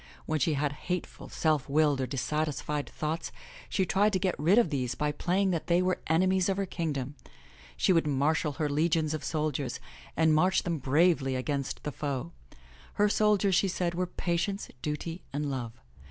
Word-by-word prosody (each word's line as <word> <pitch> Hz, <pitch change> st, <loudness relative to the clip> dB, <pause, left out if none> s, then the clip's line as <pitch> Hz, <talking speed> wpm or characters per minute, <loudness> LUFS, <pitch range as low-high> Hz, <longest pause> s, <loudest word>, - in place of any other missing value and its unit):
When 155 Hz, -, -1 dB
she 150 Hz, +3 st, +2 dB
had 145 Hz, 0 st, 0 dB, 0.2 s
hateful, 180 Hz, -1 st, -4 dB
self 155 Hz, -4 st, 0 dB
willed 145 Hz, -1 st, +3 dB
or 130 Hz, -, -1 dB
dissatisfied 150 Hz, +2 st, -2 dB
thoughts, 155 Hz, +2 st, -3 dB, 0.4 s
she 190 Hz, -, +1 dB
tried 205 Hz, +3 st, +2 dB
to -, -, +3 dB
get 185 Hz, -1 st, +1 dB
rid 170 Hz, +8 st, +4 dB
of 235 Hz, -9 st, +4 dB
these 130 Hz, -4 st, -1 dB
by 150 Hz, 0 st, 0 dB
playing 185 Hz, +6 st, +1 dB
that 165 Hz, -3 st, -2 dB
they 175 Hz, 0 st, +4 dB
were 185 Hz, 0 st, 0 dB
enemies 185 Hz, +3 st, +3 dB
of 195 Hz, -, 0 dB
her 200 Hz, -, 0 dB
kingdom. 150 Hz, -7 st, -3 dB, 0.6 s
She 185 Hz, -, +3 dB
would 165 Hz, -3 st, +2 dB
marshal 150 Hz, +2 st, +1 dB
her 155 Hz, +1 st, -1 dB
legions 155 Hz, +1 st, +1 dB
of 155 Hz, -, -4 dB
soldiers 150 Hz, -5 st, -2 dB, 0.4 s
and 160 Hz, 0 st, +4 dB
march 180 Hz, +5 st, +3 dB
them 170 Hz, -3 st, -2 dB
bravely 140 Hz, 0 st, +2 dB
against 140 Hz, +1 st, -3 dB
the 150 Hz, -, -3 dB
foe. 135 Hz, -, -3 dB, 0.6 s
Her 210 Hz, 0 st, +3 dB
soldiers, 210 Hz, -2 st, +3 dB
she 195 Hz, -, +3 dB
said, 175 Hz, -2 st, -1 dB
were 180 Hz, +1 st, -1 dB
Patience, 175 Hz, +3 st, -2 dB
Duty 165 Hz, +3 st, -4 dB
and 145 Hz, 0 st, -2 dB
Love. 120 Hz, -4 st, -4 dB
155 Hz, 180 wpm, -29 LUFS, 145-180 Hz, 0.6 s, rid